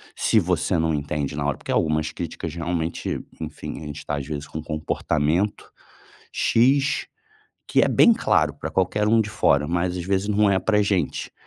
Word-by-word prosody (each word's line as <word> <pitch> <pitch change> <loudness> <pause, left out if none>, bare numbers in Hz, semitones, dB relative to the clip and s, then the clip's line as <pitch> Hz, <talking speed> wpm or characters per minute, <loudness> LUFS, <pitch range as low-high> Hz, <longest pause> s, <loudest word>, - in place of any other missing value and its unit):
se 110 - +3
você 90 -1 0
não 80 0 +1
entende 70 -1 -2
na 75 0 -2
hora. 75 -1 0
Porque - - -4
algumas 80 0 +1
críticas 85 -1 -5
realmente, 85 -1 -2 0.2
enfim, 80 0 -6
a - - -8
gente 75 0 -7
tá 75 - -2
às 70 - -4
vezes 75 0 -5
com 75 - -6
um - - -7
comportamento 75 +4 -1 0.6
x, 135 +4 +2 0.6
que - - +3
é - - +3
bem 235 - +6
claro 75 - +1
pra 75 +1 -6
qualquer 95 +4 +1
um 115 +1 +4
de 105 - -1
fora, 75 -8 +2
mas 90 +2 -1
às 90 - -4
vezes 95 +2 0
não 105 0 +3
é 95 -1 +3
pra 105 +3 +2
gente. 100 -3 -1
85 Hz, 190 wpm, -23 LUFS, 75-100 Hz, 0.6 s, bem